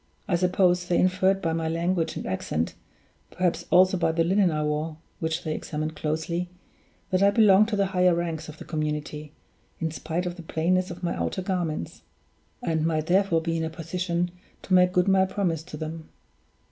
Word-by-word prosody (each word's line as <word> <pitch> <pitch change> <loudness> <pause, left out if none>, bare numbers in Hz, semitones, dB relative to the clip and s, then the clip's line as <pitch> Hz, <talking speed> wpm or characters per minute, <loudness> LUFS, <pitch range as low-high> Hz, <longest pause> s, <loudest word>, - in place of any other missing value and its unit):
I 180 - +2
supposed 180 0 +2
they 175 - +3
inferred 185 +1 +2
by 165 -2 +1
my 165 0 -1
language 170 +1 0
and - - -5
accent 80 -4 -2 0.6
perhaps 175 -1 -1
also 185 +1 +5
by 170 - +2
the 165 +1 +1
linen 190 +2 +3
I 155 -2 -1
wore, 150 +1 -2 0.2
which 160 +1 -2
they 155 - -2
examined 155 0 -4
closely 160 +4 -2 0.6
that 185 0 +2
I 200 - +6
belonged 205 -1 +5
to 220 - -1
the 200 -1 +2
higher 180 -2 +3
ranks 165 -2 -3
of 155 - -10
the - - -10
community, 150 -1 -3 0.5
in 160 -1 -1
spite 165 +3 -3
of 175 0 -4
the - - -7
plainness 180 +3 0
of 175 0 -8
my 175 - 0
outer 190 - -2
garments; 175 - -3 0.6
and 160 -2 0
might, 160 -1 0
therefore, 180 -1 +3
be 165 0 -1
in 160 - -1
a 160 - -1
position 175 +1 -2 0.3
to 185 - -2
make 180 0 +6
good 180 0 +2
my 190 -1 +5
promise 185 -5 -1
to 155 - -8
them. 160 +1 -6
170 Hz, 190 wpm, -26 LUFS, 160-185 Hz, 0.6 s, I